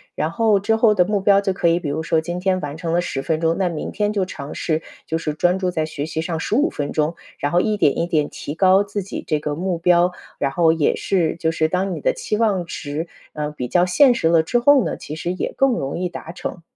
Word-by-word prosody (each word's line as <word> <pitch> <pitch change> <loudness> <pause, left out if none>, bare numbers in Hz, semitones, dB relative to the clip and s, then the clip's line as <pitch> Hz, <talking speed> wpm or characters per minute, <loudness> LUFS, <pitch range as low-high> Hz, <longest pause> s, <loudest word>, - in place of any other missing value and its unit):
然 155 +2 -1
后 215 +1 +3
之 220 +3 +1
后 220 -2 +4
的 180 -2 +4
目 205 -1 0
标 200 0 +4
就 195 -1 0
可 185 - 0
以 170 +1 +3
比 160 - -5
如 150 +3 -2
说 160 0 +1
今 175 +2 -4
天 185 0 +1
完 145 0 -5
成 165 0 -3
了 175 - +2
10 135 -6 -3
分 155 +2 -1
钟， 165 0 +1
那 185 -2 +1
明 160 - -5
天 210 +1 0
就 195 -3 0
尝 145 -5 -8
试 160 0 -1 0.2
就 160 - -1
是 155 -2 -3
专 180 +3 +2
注 185 -1 0
在 160 -3 -1
学 150 -2 -5
习 160 0 -3
上 165 0 -3
15 275 - +1
分 145 -1 -3
钟， 155 +2 0 0.2
然 145 - -2
后 175 - +3
一 215 -1 0
点 145 -7 +2
一 170 - 0
点 155 -4 +1
提 145 - -7
高 190 +2 +5
自 205 0 -4
己 190 - -6
这 155 - +1
个 150 0 -3
目 180 +1 -2
标。 175 +1 +3 0.3
然 140 - 0
后 160 +2 +3
也 160 -3 +1
是， 175 -6 0
就 160 -1 0
是 160 -1 +1
当 185 +3 -1
你 160 - -5
的 - - +2
期 210 - -3
望 205 -6 +1
值， 155 0 -5 0.3
呃， 150 -1 -3
比 130 -5 -5
较 175 +7 +3
现 245 +8 +5
实 160 - +1
了 165 -1 +5
之 200 +10 0
后 270 +1 +5
呢， - - -2
其 150 - -7
实 170 +3 -3
也 - - -3
更 270 -2 +3
容 140 -3 -3
易 180 - -1
达 165 -1 -8
成。 175 0 -6
175 Hz, 285 characters per minute, -21 LUFS, 155-195 Hz, 0.3 s, 高